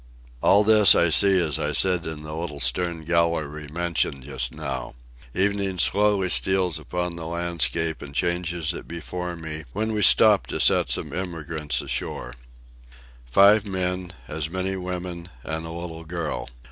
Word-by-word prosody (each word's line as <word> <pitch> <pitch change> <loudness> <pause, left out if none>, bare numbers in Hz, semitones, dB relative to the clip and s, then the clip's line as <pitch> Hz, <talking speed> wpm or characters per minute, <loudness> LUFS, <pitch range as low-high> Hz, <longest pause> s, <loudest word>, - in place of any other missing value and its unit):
All 100 +2 +5
this 105 -2 +7
I 85 -1 +3
see 95 +3 +4
as 80 -5 +1
I - - -2
sit 90 -3 +2
in 80 -1 -6
the 75 0 -7
little 80 -3 -5
stern 80 +5 -1
gallery 80 -3 -1
mentioned 80 -4 -2
just 70 - -2
now. - - -6 0.4
Evening 100 -1 0
slowly 100 +7 +2
steals 95 -2 +2
upon 90 -1 -4
the 80 -1 -6
landscape 85 -1 -1
and 70 -1 -10
changes 85 -1 -1
it - - -9
before 90 +1 -6
me, 80 -1 -7
when 110 +1 -2
we 105 - -1
stop 105 -1 +6
to - - -4
set - - +4
some - - -1
emigrants 80 -4 -3
ashore. - - -3 0.9
Five 100 - +5
men, 90 -1 -3 0.2
as 80 0 -3
many 95 +2 -3
women, 90 -1 -6
and 80 +1 -5
a - - -7
little 85 -1 -7
girl. 80 -7 -5
85 Hz, 155 wpm, -24 LUFS, 80-95 Hz, 0.9 s, this